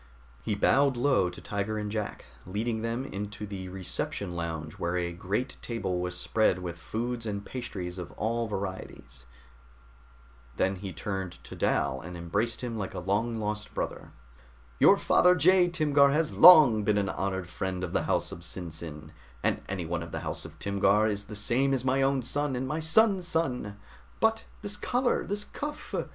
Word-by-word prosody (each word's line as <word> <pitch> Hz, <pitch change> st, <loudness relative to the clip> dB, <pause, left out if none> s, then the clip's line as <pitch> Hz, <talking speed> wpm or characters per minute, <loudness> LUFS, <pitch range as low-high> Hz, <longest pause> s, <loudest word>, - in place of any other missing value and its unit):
He 105 Hz, -, -1 dB
bowed 135 Hz, +5 st, +3 dB
low 125 Hz, -8 st, +3 dB
to 90 Hz, -, -10 dB
Tiger 100 Hz, +1 st, -2 dB
and 105 Hz, -1 st, -3 dB
Jack, 105 Hz, -1 st, -4 dB, 0.2 s
leading 110 Hz, +4 st, -2 dB
them 115 Hz, +3 st, -2 dB
into 105 Hz, -2 st, -5 dB
the 95 Hz, -2 st, -6 dB
reception 95 Hz, 0 st, -3 dB
lounge 80 Hz, -3 st, -5 dB
where 85 Hz, +1 st, -1 dB
a 85 Hz, -1 st, -2 dB
great 100 Hz, +9 st, -3 dB
table 95 Hz, -7 st, -2 dB
was 90 Hz, 0 st, -3 dB
spread 110 Hz, -1 st, +2 dB
with 85 Hz, -2 st, -6 dB
foods 115 Hz, +5 st, -3 dB
and 100 Hz, -1 st, -4 dB
pastries 95 Hz, -8 st, -5 dB
of 90 Hz, -1 st, -7 dB
all 115 Hz, +2 st, -1 dB
varieties. 95 Hz, -, -6 dB, 1.3 s
Then 95 Hz, 0 st, +1 dB
he 95 Hz, 0 st, -6 dB
turned 95 Hz, +1 st, -4 dB
to -, -, -9 dB
Dal 65 Hz, 0 st, 0 dB
and 90 Hz, +1 st, -8 dB
embraced 100 Hz, +8 st, -1 dB
him 120 Hz, -3 st, -4 dB
like 95 Hz, -, -4 dB
a -, -, -3 dB
long 105 Hz, +6 st, 0 dB
lost 105 Hz, -1 st, -4 dB
brother. -, -, -4 dB, 0.7 s
"Your -, -, +7 dB
father 180 Hz, 0 st, +4 dB
Jai 180 Hz, +3 st, +5 dB
Timgar 150 Hz, -5 st, +4 dB
has 155 Hz, +2 st, +1 dB
long 155 Hz, -11 st, +9 dB
been 105 Hz, 0 st, +2 dB
an 100 Hz, -2 st, +1 dB
honored 95 Hz, -1 st, -2 dB
friend 90 Hz, 0 st, -3 dB
of 90 Hz, -, -4 dB
the -, -, +1 dB
house -, -, +1 dB
of -, -, -7 dB
SinSin, 80 Hz, -3 st, -6 dB, 0.3 s
and -, -, +1 dB
anyone 85 Hz, -3 st, -2 dB
of 85 Hz, -, -7 dB
the -, -, -4 dB
house -, -, -4 dB
of -, -, -11 dB
Timgar 100 Hz, +1 st, +2 dB
is 100 Hz, -1 st, -2 dB
the 105 Hz, -, -8 dB
same 130 Hz, +6 st, +2 dB
as 130 Hz, -1 st, -3 dB
my 135 Hz, +1 st, +2 dB
own 135 Hz, -1 st, +2 dB
son 145 Hz, +2 st, -1 dB
and 130 Hz, +1 st, -2 dB
my 155 Hz, +4 st, -2 dB
son's 185 Hz, +3 st, +3 dB
son! 125 Hz, -, -1 dB, 0.4 s
But 225 Hz, 0 st, +2 dB, 0.2 s
this 205 Hz, 0 st, -2 dB
collar! 245 Hz, 0 st, +1 dB
This 205 Hz, +1 st, -1 dB
cuff! 295 Hz, +5 st, -7 dB
105 Hz, 175 wpm, -29 LUFS, 90-130 Hz, 1.3 s, long